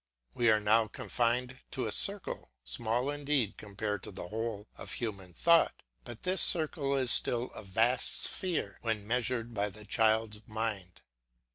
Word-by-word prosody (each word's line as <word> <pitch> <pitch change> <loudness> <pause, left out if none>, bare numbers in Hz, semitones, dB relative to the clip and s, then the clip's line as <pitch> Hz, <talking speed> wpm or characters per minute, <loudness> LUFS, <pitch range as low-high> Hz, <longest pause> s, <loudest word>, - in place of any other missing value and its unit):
We 120 -1 +2
are 110 -1 +5
now 110 +2 +4
confined 125 +4 -1
to - - -2
a - - -2
circle, - - +2
small 120 - -1
indeed 145 -6 0
compared 105 -1 -4
with 95 - -9
the 90 -2 -6
whole 110 -1 -4
of - - -5
human 100 -6 -4
thought, 170 -1 +4 0.2
but 120 -2 -9
this 185 +1 +1
circle 150 -4 +2
is 130 -3 +2
still 120 +2 +1
a - - -8
vast 115 +5 +2
sphere 165 - -1
when 110 -3 -2
measured 120 0 -1
by 105 -1 0
the 105 +2 -11
child's 110 -1 +1
mind. 105 -5 -4
115 Hz, 155 wpm, -31 LUFS, 105-125 Hz, 0.2 s, are